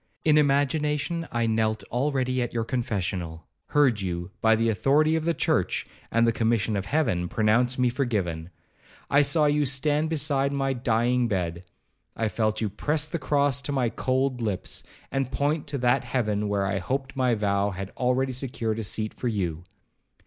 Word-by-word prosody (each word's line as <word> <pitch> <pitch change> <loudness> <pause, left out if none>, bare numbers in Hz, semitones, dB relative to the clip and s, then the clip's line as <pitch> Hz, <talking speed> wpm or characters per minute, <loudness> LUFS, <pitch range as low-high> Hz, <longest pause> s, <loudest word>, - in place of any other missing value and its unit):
In 155 -1 +5
imagination 150 +3 +1
I 120 -1 0
knelt 110 -1 0
already 130 0 0
at 120 0 -3
your 115 - +1
confessional,—heard 105 - -1
you, 85 -1 -4
by 110 0 +5
the 115 +1 +1
authority 145 - +3
of 160 -1 -1
the 170 -1 +1
church, - - 0 0.2
and 115 +1 +3
the 115 - +4
commission 115 -1 +1
of 100 -1 -3
Heaven, 90 - 0
pronounce 120 +4 +2
me 125 -1 +3
forgiven. 100 - -2 0.6
I 140 - +6
saw 150 +2 +3
you 150 0 +2
stand 145 +3 +1
beside 140 -3 +1
my 135 -1 0
dying 120 0 +1
bed,—I 90 +3 -5
felt 110 0 -1
you 110 - 0
press 150 +8 0
the 165 +2 -4
cross 140 -1 +1
to 140 - -3
my 130 -4 +1
cold 130 +1 -1
lips, 105 -5 -2 0.3
and 135 -2 -1
point 145 +2 -1
to 140 -1 -2
that 120 -1 +2
heaven 105 -4 -1
where 100 -1 0
I 95 0 -1
hoped 135 +8 -3
my 130 -3 +2
vow 100 -1 +1
had 95 0 -6
already 130 +1 0
secured 120 -4 -2
a - - -3
seat 110 +1 -1
for 125 - -4
you. 90 -7 -2
125 Hz, 170 wpm, -26 LUFS, 105-140 Hz, 0.6 s, I